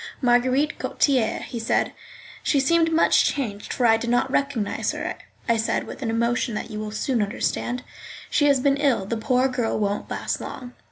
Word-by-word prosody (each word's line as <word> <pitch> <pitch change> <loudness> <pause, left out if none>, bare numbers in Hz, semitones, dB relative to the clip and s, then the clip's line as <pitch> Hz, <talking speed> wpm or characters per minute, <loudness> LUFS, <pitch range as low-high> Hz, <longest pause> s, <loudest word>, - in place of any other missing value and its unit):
"Marguerite 255 +4 +2
Gautier," 255 -6 +1
he 235 - -5
said. 225 - +1 0.5
"She 285 - +2
seems 330 +4 +3
much 325 0 +4
changed, 215 -8 -2
for 250 - 0
I 225 -1 +6
did 235 +1 -4
not 245 +2 +1
recognise 275 -7 0
her," - - -4 0.3
I 230 -1 +3
said, 225 - 0
with - - -9
an 235 - -2
emotion 235 0 0
that 230 - -5
you 210 - -5
will 215 0 -4
soon 230 +3 -1
understand. 240 +3 -2 0.4
"She 290 - +2
has 280 -2 +4
been 275 +2 +2
ill; 270 -9 +1
the 230 - -2
poor 250 +3 +2
girl 250 -3 -1
won't 205 -1 -2
last - - -3
long." 250 -1 -8
245 Hz, 185 wpm, -24 LUFS, 225-275 Hz, 0.5 s, I